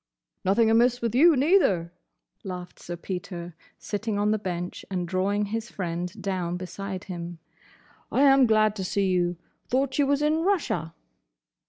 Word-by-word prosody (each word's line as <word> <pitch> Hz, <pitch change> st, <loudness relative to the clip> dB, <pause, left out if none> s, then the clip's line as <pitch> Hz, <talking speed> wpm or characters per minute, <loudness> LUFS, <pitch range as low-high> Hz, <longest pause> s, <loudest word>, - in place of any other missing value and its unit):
"Nothing 220 Hz, +4 st, +3 dB
amiss 240 Hz, +2 st, +4 dB
with 230 Hz, -3 st, -2 dB
you, 315 Hz, +6 st, +6 dB
neither," 255 Hz, -, +3 dB, 0.5 s
laughed 180 Hz, -1 st, -7 dB
Sir 175 Hz, -, -6 dB
Peter, 175 Hz, -1 st, -6 dB, 0.2 s
sitting 210 Hz, 0 st, -3 dB
on 205 Hz, +1 st, +2 dB
the 215 Hz, -, +1 dB
bench 180 Hz, -3 st, -4 dB
and 180 Hz, -2 st, -2 dB
drawing 195 Hz, +3 st, 0 dB
his 225 Hz, +2 st, -4 dB
friend 175 Hz, -1 st, -3 dB
down 180 Hz, -3 st, -2 dB
beside 190 Hz, +1 st, -6 dB
him. 175 Hz, -3 st, -6 dB, 0.7 s
"I 275 Hz, -, +3 dB
am 270 Hz, -2 st, +6 dB
glad 215 Hz, -1 st, +3 dB
to 190 Hz, -, -3 dB
see 195 Hz, +2 st, 0 dB
you! 175 Hz, -1 st, +1 dB, 0.3 s
Thought 265 Hz, +2 st, 0 dB
you 285 Hz, -, +4 dB
was 285 Hz, +1 st, +2 dB
in 305 Hz, +1 st, +2 dB
Russia." 295 Hz, -, 0 dB
200 Hz, 155 wpm, -26 LUFS, 180-240 Hz, 0.7 s, you